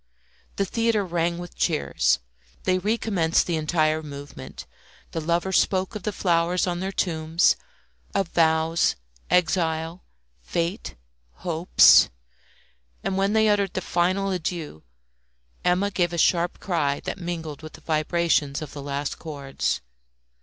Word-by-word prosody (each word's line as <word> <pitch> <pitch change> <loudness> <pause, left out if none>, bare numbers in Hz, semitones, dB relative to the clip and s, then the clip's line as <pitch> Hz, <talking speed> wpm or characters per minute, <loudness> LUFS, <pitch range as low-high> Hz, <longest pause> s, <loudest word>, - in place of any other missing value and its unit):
The 200 - 0
theatre 225 0 +1
rang 170 -1 0
with 175 0 -8
cheers; 160 -4 +1 0.5
they 185 0 +2
recommenced 195 -5 +1
the 170 - -1
entire 155 0 +1
movement; 145 -1 -9 0.5
the 165 - -3
lovers 170 +4 +2
spoke 190 -1 0
of 215 - -5
the 210 - -2
flowers 175 -2 +1
on 175 -1 -2
their 190 +1 -2
tomb, 160 -4 -3 0.8
of 195 -3 +1
vows, 160 0 +2 0.3
exile, 170 -1 +1 0.4
fate, 170 - -3 0.5
hopes; 170 0 +6 0.9
and 190 - -1
when 195 +2 +1
they 220 0 +4
uttered 200 -2 +1
the 185 - -1
final 185 +3 0
adieu, 165 - -4 0.8
Emma 185 +3 +2
gave 175 -3 0
a - - -2
sharp 170 +1 +2
cry 145 -7 0
that - - -5
mingled 165 -4 -5
with 155 -1 -10
the - - -13
vibrations 155 -2 +1
of 150 - -9
the 145 - -7
last 140 0 -3
chords. 140 - -3
170 Hz, 130 wpm, -25 LUFS, 160-185 Hz, 0.9 s, hopes